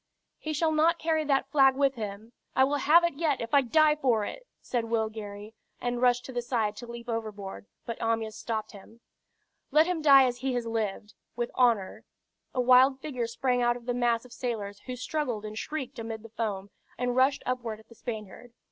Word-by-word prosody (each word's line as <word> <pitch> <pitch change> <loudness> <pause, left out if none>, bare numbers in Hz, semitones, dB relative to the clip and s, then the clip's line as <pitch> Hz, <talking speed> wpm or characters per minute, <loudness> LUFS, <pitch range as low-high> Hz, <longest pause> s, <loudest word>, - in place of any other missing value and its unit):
"He 310 - -4
shall 315 +2 +1
not 320 +2 +3
carry 320 -1 0
that 275 -1 +1
flag 270 -2 +5
with 275 -1 +2
him! 215 0 -7 0.2
I 260 - +5
will 285 +2 +2
have 315 +5 +5
it 340 - +1
yet, 305 -4 +1
if 230 +3 -6
I 285 - +7
die 300 +4 +4
for 245 -8 +1
it!" - - -8
said 240 -2 -2
Will 225 -1 0
Gary, 210 0 -8 0.3
and 245 0 -2
rushed 245 0 +3
to 260 - -8
the 245 - -1
side 225 -4 -1
to 240 - -8
leap 235 0 -9
overboard, 210 -4 -5 0.2
but 230 - -5
Amyas 225 -1 -1
stopped 220 -2 -4
him. 225 +3 -15 0.7
"Let 310 +1 +5
him 355 -2 -1
die 275 -3 +8
as 245 -1 -1
he 260 0 -1
has 240 -1 -1
lived, 215 -2 -3 0.2
with 240 0 -2
honor." 230 -7 +2 0.5
A 255 - -3
wild 255 +2 +5
figure 255 -5 -3
sprang 250 +1 0
out 240 0 +2
of 240 - -15
the 245 - -1
mass 240 -1 +1
of 245 - -13
sailors 210 -6 -4
who 255 - -4
struggled 250 -4 -3
and 215 0 -6
shrieked 265 +1 -5
amid 225 -1 -6
the 230 - -11
foam, 205 -3 -4 0.3
and 245 0 -1
rushed 265 +2 +3
upward 240 -4 -3
at 220 - -19
the - - -15
Spaniard. 225 +1 -8
240 Hz, 210 wpm, -28 LUFS, 225-270 Hz, 0.7 s, die